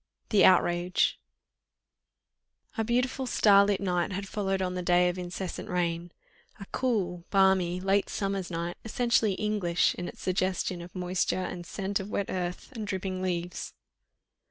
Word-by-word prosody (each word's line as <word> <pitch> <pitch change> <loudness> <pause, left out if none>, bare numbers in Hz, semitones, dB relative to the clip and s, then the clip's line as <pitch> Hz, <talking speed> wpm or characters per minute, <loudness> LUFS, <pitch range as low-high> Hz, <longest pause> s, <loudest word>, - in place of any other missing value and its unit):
THE 205 -4 +5
OUTRAGE 175 -1 +3 1.6
A 225 - 0
beautiful 250 +3 0
starlit 200 -3 +5
night 180 -1 0
had 195 +1 -4
followed 195 -1 -1
on 185 -1 -1
the 180 - -3
day 180 0 +4
of 180 +1 -4
incessant 180 +1 -5
rain: 175 -1 -1 0.5
a 200 - -7
cool, 190 -9 -1
balmy, 190 -2 +3
late 195 +1 +1
summer's 195 -2 -2
night, 170 0 -3
essentially 230 -2 +2
English 195 -4 +1
in 175 - -5
its - - -9
suggestion 185 -1 -1
of 175 +2 -11
moisture 185 0 0
and 175 -2 -6
scent 195 0 -2
of 195 +1 -6
wet 200 -2 -2
earth 180 +4 -4
and 220 -5 -6
dripping 190 -1 -3
leaves. 175 -2 -3
185 Hz, 145 wpm, -28 LUFS, 180-200 Hz, 1.6 s, THE